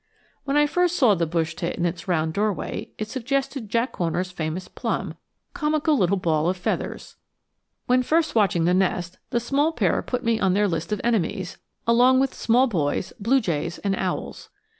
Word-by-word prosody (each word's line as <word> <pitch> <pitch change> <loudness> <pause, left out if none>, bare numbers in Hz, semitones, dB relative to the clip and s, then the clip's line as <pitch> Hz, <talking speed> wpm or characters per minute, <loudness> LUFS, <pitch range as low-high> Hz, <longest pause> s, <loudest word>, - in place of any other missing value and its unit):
When 280 +1 +1
I 295 - +5
first 355 +3 +1
saw 245 -10 +5
the 170 -3 0
bush 160 -1 -1
tit 170 +2 -3
in 175 - -1
its 170 +1 -3
round 160 -3 0
doorway, 210 0 -2
it 215 - -3
suggested 260 -1 -2
Jack 235 +4 0
Horner's 180 +1 -1
famous 170 +1 -4
plum, - - -3 0.4
comical 310 -2 +1
little 195 -5 +2
ball 165 -2 +1
of 185 - -1
feathers! 180 - -4 0.7
When 250 +1 +3
first 320 +5 +1
watching 190 -7 +2
the 175 - +3
nest 180 -1 0
the 240 - +1
small 280 +6 +1
pair - - +1
put 250 0 -3
me 230 -1 +1
on 190 -3 +2
their 205 0 +3
list 165 -1 -3
of 210 - -1
enemies, 200 -5 -1 0.3
along 245 +3 +5
with 270 0 +1
small 245 +3 +3
boys, 175 - -1
blue 240 +6 +3
jays, 170 - -2
and 195 -1 -1
owls. 185 -1 -4
205 Hz, 185 wpm, -24 LUFS, 175-255 Hz, 0.7 s, I